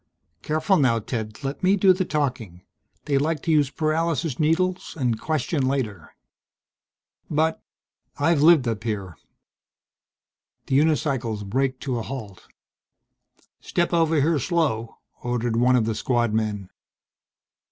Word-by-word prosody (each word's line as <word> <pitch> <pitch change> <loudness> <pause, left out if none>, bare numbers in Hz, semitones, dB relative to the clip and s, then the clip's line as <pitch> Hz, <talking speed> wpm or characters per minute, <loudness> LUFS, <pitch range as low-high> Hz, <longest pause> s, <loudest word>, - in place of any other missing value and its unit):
"Careful 155 +5 +1
now, 125 -5 +3
Ted. 110 0 -5
Let 135 +1 -4
me 190 +2 +4
do 190 -1 +5
the 185 0 -1
talking. 125 - -3 0.4
They 140 -2 +1
like 155 0 -1
to 165 - 0
use 150 -3 +3
paralysis 155 -2 -1
needles 180 +3 0
and 120 -4 0
question 155 -2 -1
later." 115 - -3 1.1
"But 160 +1 0 0.3
" - - -41
"I've 165 -4 +3
lived 155 -5 +6
up 110 -1 -2
here." 100 -7 -4 1.5
The 135 - +2
unicycles 135 -9 0
braked 130 +4 -1
to 130 -4 -2
a - - -3
halt. 110 -6 -8 1.1
"Step 175 0 -1
over 165 -1 +3
here, 155 +2 +2
slow," 135 -9 -1 0.2
ordered 120 -1 -1
one 125 +2 +4
of 120 -3 +2
the 110 - -1
Squadmen. 110 -4 -1
135 Hz, 130 wpm, -24 LUFS, 115-160 Hz, 1.5 s, lived